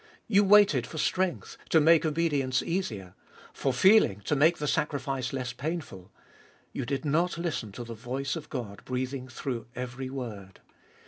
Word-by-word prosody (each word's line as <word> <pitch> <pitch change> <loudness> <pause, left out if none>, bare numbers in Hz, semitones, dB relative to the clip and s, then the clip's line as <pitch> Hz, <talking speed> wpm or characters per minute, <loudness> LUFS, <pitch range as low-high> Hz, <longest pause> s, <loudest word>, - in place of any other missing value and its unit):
You 205 -2 +4
waited 195 - +5
for 155 - -8
strength, 185 +2 -1
to 160 - +5
make 160 +1 +5
obedience 145 -5 0
easier; 110 - -3 0.4
for 135 - 0
feeling, 160 - +5
to 125 - 0
make 160 +4 +4
the 150 - -3
sacrifice 135 -4 -1
less 130 -2 -3
painful. 140 - -5 0.6
You - - -4
did 140 +2 -2
not 165 +5 +1
listen 160 -11 -3
to 120 - -6
the 115 0 -7
voice 130 +4 -3
of 160 -3 -7
God 100 -8 -6
breathing 130 +1 -3
through 125 -2 -5
every 125 +1 -5
word. 110 -8 -7
135 Hz, 155 wpm, -28 LUFS, 125-160 Hz, 0.6 s, waited